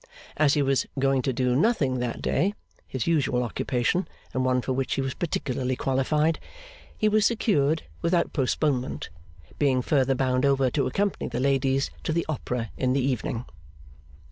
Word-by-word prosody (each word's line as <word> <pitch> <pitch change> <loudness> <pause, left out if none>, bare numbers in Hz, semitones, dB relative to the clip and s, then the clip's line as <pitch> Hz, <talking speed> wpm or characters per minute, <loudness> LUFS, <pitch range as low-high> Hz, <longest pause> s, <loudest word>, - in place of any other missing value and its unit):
As 150 -1 +3
he 145 - +2
was 135 -1 +1
going 135 0 +2
to 135 - 0
do 125 0 +1
nothing 140 - +2
that 120 -1 -3
day 200 +4 +1 0.3
(his 130 -3 -3
usual 140 -6 +1
occupation, 125 +8 0 0.3
and 130 - 0
one 130 -1 +1
for 130 - -1
which 130 0 -1
he 135 - 0
was 135 -1 -2
particularly 130 -6 -2
qualified), 150 +5 +1 0.6
he 215 - +2
was 215 0 +3
secured 160 -10 +2 0.2
without 170 0 +1
postponement; 135 -1 0 0.5
being 130 -3 +2
further 135 -2 +2
bound 130 0 +1
over 135 -2 +3
to 140 - +1
accompany 200 -1 -1
the - - -3
ladies 135 0 +1
to - - -1
the 170 +1 0
Opera 125 -6 -3
in 130 -1 +1
the 140 - +2
evening. 125 -2 -2
135 Hz, 165 wpm, -26 LUFS, 130-155 Hz, 0.6 s, As